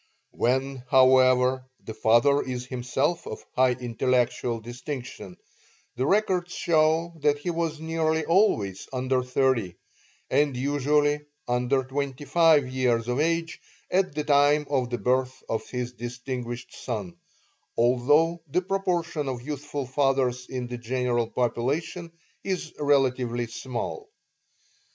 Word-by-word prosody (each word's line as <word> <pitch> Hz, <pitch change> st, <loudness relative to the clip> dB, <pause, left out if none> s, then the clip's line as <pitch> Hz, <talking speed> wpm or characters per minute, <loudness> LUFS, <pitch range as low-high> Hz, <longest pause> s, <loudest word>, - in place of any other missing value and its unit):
When, 130 Hz, +3 st, 0 dB
however, 130 Hz, -1 st, +5 dB, 0.2 s
the 110 Hz, -, -7 dB
father 120 Hz, +6 st, +4 dB
is 125 Hz, -1 st, -4 dB
himself 130 Hz, +6 st, -1 dB
of -, -, -7 dB
high 130 Hz, -1 st, +4 dB
intellectual 120 Hz, 0 st, 0 dB
distinction, 120 Hz, -, -7 dB, 0.6 s
the 130 Hz, +3 st, -1 dB
records 185 Hz, -3 st, +1 dB
show 160 Hz, +1 st, +2 dB
that 145 Hz, 0 st, +2 dB
he 160 Hz, +5 st, -3 dB
was 165 Hz, -2 st, -2 dB
nearly 160 Hz, -1 st, 0 dB
always 115 Hz, -, +2 dB
under 130 Hz, 0 st, 0 dB
thirty, 125 Hz, -7 st, 0 dB, 0.5 s
and 145 Hz, -3 st, +1 dB
usually 145 Hz, +2 st, +2 dB, 0.3 s
under 125 Hz, +2 st, +1 dB
twenty 140 Hz, +1 st, -4 dB
five 155 Hz, -2 st, +4 dB
years 125 Hz, -3 st, 0 dB
of 125 Hz, +2 st, -1 dB
age 165 Hz, +1 st, 0 dB, 0.3 s
at 185 Hz, -5 st, +1 dB
the 150 Hz, -, -1 dB
time 145 Hz, +1 st, +4 dB
of 130 Hz, -3 st, +1 dB
the 120 Hz, -, -2 dB
birth 130 Hz, +1 st, 0 dB
of 110 Hz, -, -3 dB
his 125 Hz, -1 st, -3 dB
distinguished 125 Hz, 0 st, -6 dB
son, 100 Hz, -8 st, -4 dB, 0.6 s
although 145 Hz, +8 st, +3 dB
the 180 Hz, +6 st, 0 dB
proportion 175 Hz, -6 st, -1 dB
of 125 Hz, -2 st, -5 dB
youthful 145 Hz, 0 st, -4 dB
fathers 130 Hz, -2 st, 0 dB
in 125 Hz, -1 st, -3 dB
the 120 Hz, 0 st, -6 dB
general 120 Hz, -1 st, 0 dB
population 145 Hz, +9 st, -2 dB, 0.3 s
is 185 Hz, -4 st, -3 dB
relatively 130 Hz, -4 st, +1 dB
small. 130 Hz, -, -5 dB
130 Hz, 125 wpm, -26 LUFS, 125-150 Hz, 0.6 s, however